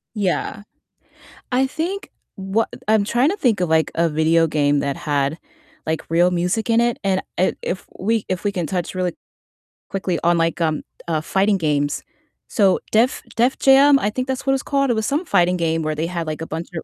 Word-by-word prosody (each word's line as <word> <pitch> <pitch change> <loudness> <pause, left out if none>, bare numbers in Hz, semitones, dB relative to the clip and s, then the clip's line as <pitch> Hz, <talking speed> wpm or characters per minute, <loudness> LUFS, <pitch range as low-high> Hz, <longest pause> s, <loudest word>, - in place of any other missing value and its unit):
Yeah. 205 0 -1 0.9
I 260 +2 +3
think 355 +8 -4 0.3
wha 195 +4 0 0.2
I'm 215 -2 +4
trying 245 - +2
to 405 - -2
think 235 - +1
of 180 - +1
like 160 0 +2
a 170 0 +2
video 160 +2 +3
game 145 -2 +1
that 140 -1 -2
had 145 +1 -1 0.5
like 160 0 -1
real 175 +2 +4
music 180 +6 -1
in 230 0 +4
it, 240 0 +1
and, 190 -1 +1 0.2
eh, 185 - +3
if 185 - -4
we 220 +2 0
if 185 +1 -3
we 205 - +1
can 175 -4 -2
touch 180 +1 -3
really 180 -2 -1 0.8
quickly 185 -3 -2
on 170 0 +3
like, 165 +1 0
um, 155 -2 0 0.2
uh, 160 -2 0
fighting 195 +4 +1
games. 145 -3 0 0.5
So 195 -4 +3
Def 230 +4 +2
Def 245 +3 +2
Jam, 275 +1 +6
I 205 - 0
think 255 +4 -3
that's 265 +1 -3
what 270 - +3
it's 270 - -1
called, 275 -2 +1
it - - +3
was 220 -1 -1
some 300 +6 -1
fighting 180 - +2
game 165 -1 0
where 155 0 -1
they 160 +2 -2
had 170 -2 -4
like 155 +1 -4
a 165 - -5
bunch 165 +2 -5
of 160 - -4
185 Hz, 205 wpm, -21 LUFS, 165-230 Hz, 0.9 s, Jam